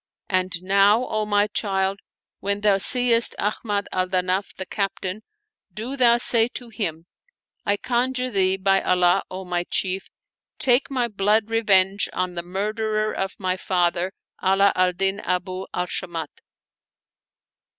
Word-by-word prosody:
And 185 Hz, -2 st, -1 dB
now, 200 Hz, +5 st, +4 dB, 0.2 s
my 205 Hz, 0 st, +2 dB
child, 195 Hz, -2 st, -1 dB, 0.4 s
when 200 Hz, +1 st, -2 dB
thou 205 Hz, -2 st, +3 dB
seest 240 Hz, +1 st, +5 dB
Ahmad 205 Hz, 0 st, -2 dB
al 185 Hz, 0 st, 0 dB
Danaf 185 Hz, +1 st, -1 dB
the 190 Hz, -, -6 dB
captain, 195 Hz, 0 st, -3 dB, 0.5 s
do 225 Hz, +9 st, -5 dB
thou 240 Hz, -3 st, +4 dB
say 230 Hz, -1 st, +3 dB
to 245 Hz, -2 st, -5 dB
him: 165 Hz, -8 st, -4 dB, 0.6 s
I 205 Hz, 0 st, +2 dB
conjure 255 Hz, +2 st, -1 dB
thee, 190 Hz, -2 st, +2 dB
by 195 Hz, 0 st, +2 dB
Allah, 180 Hz, -1 st, +3 dB
O 185 Hz, +1 st, -7 dB
my 175 Hz, -1 st, -1 dB
chief, 190 Hz, +1 st, -2 dB, 0.5 s
take 255 Hz, +1 st, +3 dB
my 255 Hz, -3 st, 0 dB
blood 210 Hz, +1 st, +1 dB
revenge 200 Hz, -3 st, +3 dB
on 185 Hz, -1 st, -2 dB
the 170 Hz, -, -4 dB
murderer 215 Hz, +4 st, -2 dB
of 190 Hz, 0 st, -4 dB
my 185 Hz, -2 st, -1 dB
father 180 Hz, 0 st, 0 dB, 0.3 s
Ala 195 Hz, +1 st, +4 dB
al 185 Hz, 0 st, +2 dB
Din 195 Hz, +2 st, 0 dB
Abu 185 Hz, 0 st, -3 dB
al 180 Hz, -, -2 dB
Shamat! 170 Hz, -4 st, -5 dB
195 Hz, 140 wpm, -23 LUFS, 185-215 Hz, 0.6 s, seest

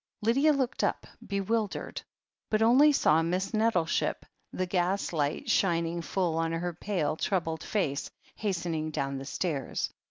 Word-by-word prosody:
Lydia 270 Hz, +8 st, +4 dB
looked 270 Hz, -4 st, 0 dB
up, -, -, 0 dB, 0.2 s
bewildered, 205 Hz, +1 st, -2 dB, 0.5 s
but 215 Hz, 0 st, +2 dB
only 265 Hz, +7 st, +6 dB
saw 160 Hz, -, +4 dB
Miss 180 Hz, +5 st, -1 dB
Net 225 Hz, +1 st, +2 dB
tleship, 170 Hz, -2 st, 0 dB, 0.3 s
the 185 Hz, -, -1 dB
gas 180 Hz, +1 st, 0 dB
light 145 Hz, -2 st, -1 dB
shining 170 Hz, -2 st, +1 dB
full 170 Hz, -1 st, -1 dB
on 165 Hz, 0 st, 0 dB
her 175 Hz, +1 st, -2 dB
pale, 170 Hz, -4 st, -1 dB
troubled 165 Hz, -3 st, -1 dB
face, 150 Hz, -10 st, -1 dB, 0.3 s
hastening 170 Hz, -6 st, -2 dB
down 135 Hz, -2 st, -2 dB
the 135 Hz, -, -7 dB
stairs. 145 Hz, -3 st, -2 dB
175 Hz, 140 wpm, -29 LUFS, 160-210 Hz, 0.5 s, only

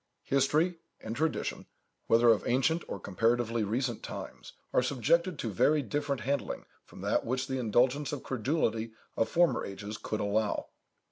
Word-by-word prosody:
History 150 Hz, +6 st, +2 dB, 0.2 s
and 110 Hz, +1 st, -5 dB
tradition, 155 Hz, +4 st, -1 dB, 0.4 s
whether 115 Hz, +1 st, +5 dB
of 110 Hz, -2 st, +5 dB
ancient 135 Hz, +7 st, +2 dB
or 100 Hz, -, -5 dB
comparatively 115 Hz, +4 st, +1 dB
recent 120 Hz, +3 st, -1 dB
times, -, -, -8 dB, 0.2 s
are -, -, +5 dB
subjected 150 Hz, -, +1 dB
to 115 Hz, -, -3 dB
very 145 Hz, +10 st, +3 dB
different 140 Hz, +3 st, -2 dB
handling 140 Hz, +2 st, -2 dB, 0.2 s
from -, -, -13 dB
that -, -, +1 dB
which 130 Hz, +2 st, -1 dB
the 130 Hz, 0 st, -2 dB
indulgence 125 Hz, +5 st, +2 dB
or 145 Hz, -, -3 dB
credulity 115 Hz, -3 st, -1 dB, 0.2 s
of 115 Hz, -, +1 dB
former 175 Hz, 0 st, +3 dB
ages 105 Hz, +2 st, -6 dB
could 110 Hz, -, -3 dB
allow. 105 Hz, +1 st, 0 dB
125 Hz, 150 wpm, -30 LUFS, 110-145 Hz, 0.4 s, whether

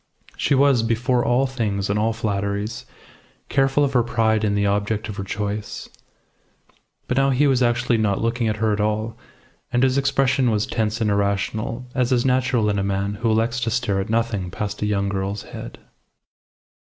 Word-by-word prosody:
She 140 Hz, -, +1 dB
was, 135 Hz, -3 st, +4 dB
before 120 Hz, +2 st, +1 dB
all 125 Hz, +3 st, +2 dB
things 105 Hz, -7 st, -2 dB
and 100 Hz, +1 st, 0 dB
all 110 Hz, +2 st, +2 dB
flatteries, 100 Hz, -1 st, -3 dB, 0.6 s
careful 135 Hz, +1 st, +2 dB
of 140 Hz, -1 st, 0 dB
her 125 Hz, -, +4 dB
pride 110 Hz, -2 st, +1 dB
in 100 Hz, -1 st, +1 dB
the 100 Hz, 0 st, +1 dB
object 105 Hz, +2 st, 0 dB
of 105 Hz, -, -6 dB
her 100 Hz, -, -3 dB
choice. 105 Hz, +1 st, -4 dB, 1.2 s
But 125 Hz, -, -1 dB
now 135 Hz, 0 st, +4 dB
he 135 Hz, +2 st, +3 dB
was 135 Hz, -3 st, +3 dB
actually 120 Hz, -1 st, +2 dB
not 100 Hz, -3 st, +1 dB
looking 115 Hz, +1 st, 0 dB
at 110 Hz, -, 0 dB
her 110 Hz, 0 st, +1 dB
at 105 Hz, -, -1 dB
all; 110 Hz, +2 st, -1 dB, 0.6 s
and 120 Hz, +1 st, +2 dB
his 130 Hz, +1 st, +3 dB
expression 135 Hz, -1 st, +2 dB
was 105 Hz, -2 st, +1 dB
tense 110 Hz, 0 st, -2 dB
and 105 Hz, -2 st, +2 dB
irrational, 100 Hz, +4 st, -1 dB
as 125 Hz, 0 st, 0 dB
is 125 Hz, -1 st, +2 dB
natural 130 Hz, -3 st, +2 dB
in 100 Hz, -1 st, +1 dB
a -, -, 0 dB
man 100 Hz, +1 st, -1 dB
who 115 Hz, -, +1 dB
elects 115 Hz, +2 st, +1 dB
to 120 Hz, -, -1 dB
stare 115 Hz, -4 st, 0 dB
at 95 Hz, -, -6 dB
nothing 110 Hz, -5 st, 0 dB
past 105 Hz, +2 st, -5 dB
a 105 Hz, -, 0 dB
young 100 Hz, -1 st, 0 dB
girl's 100 Hz, +1 st, -3 dB
head. -, -, -9 dB
110 Hz, 190 wpm, -22 LUFS, 105-125 Hz, 1.2 s, was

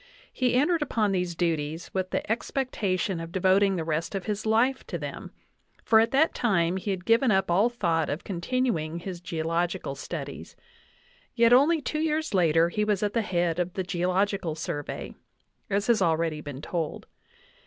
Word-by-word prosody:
He 250 Hz, -2 st, +1 dB
entered 320 Hz, +5 st, +2 dB
upon 220 Hz, -8 st, +1 dB
these 180 Hz, -2 st, -1 dB
duties 160 Hz, -1 st, -2 dB
with 185 Hz, -1 st, -1 dB
the -, -, -2 dB
expectation 210 Hz, -6 st, -1 dB
of 165 Hz, 0 st, -7 dB
devoting 190 Hz, +2 st, +3 dB
the 165 Hz, -, -2 dB
rest 160 Hz, +4 st, -2 dB
of 195 Hz, -, -3 dB
his 215 Hz, 0 st, -3 dB
life 245 Hz, +5 st, +2 dB
to -, -, -3 dB
them, -, -, -7 dB, 0.5 s
for 220 Hz, -, +5 dB
at 225 Hz, +1 st, +3 dB
that 285 Hz, +6 st, +3 dB
time 185 Hz, -6 st, +1 dB
he 190 Hz, -, -4 dB
had 185 Hz, -2 st, -3 dB
given 230 Hz, +3 st, +4 dB
up 190 Hz, -3 st, +2 dB
all 200 Hz, +7 st, +4 dB
thought 170 Hz, -9 st, 0 dB
of 150 Hz, -, -3 dB
continuing 175 Hz, -4 st, -1 dB
his 175 Hz, 0 st, -6 dB
geological 170 Hz, -1 st, -2 dB
studies; 135 Hz, -, -7 dB, 0.8 s
yet 235 Hz, 0 st, +5 dB
only 300 Hz, +5 st, +5 dB
two 305 Hz, +3 st, -2 dB
years 315 Hz, -2 st, -1 dB
later 165 Hz, -2 st, +4 dB
he 210 Hz, +4 st, -1 dB
was 210 Hz, -1 st, 0 dB
at 205 Hz, -, 0 dB
the 230 Hz, -, +2 dB
head 175 Hz, -4 st, 0 dB
of 180 Hz, 0 st, -1 dB
the 190 Hz, -, -2 dB
Geological 185 Hz, -1 st, 0 dB
Survey, 145 Hz, -2 st, -5 dB, 0.6 s
as 200 Hz, +1 st, 0 dB
has 235 Hz, -3 st, +3 dB
already 165 Hz, -2 st, +1 dB
been 145 Hz, -1 st, -8 dB
told. 165 Hz, -3 st, -3 dB
190 Hz, 175 wpm, -27 LUFS, 170-225 Hz, 0.8 s, for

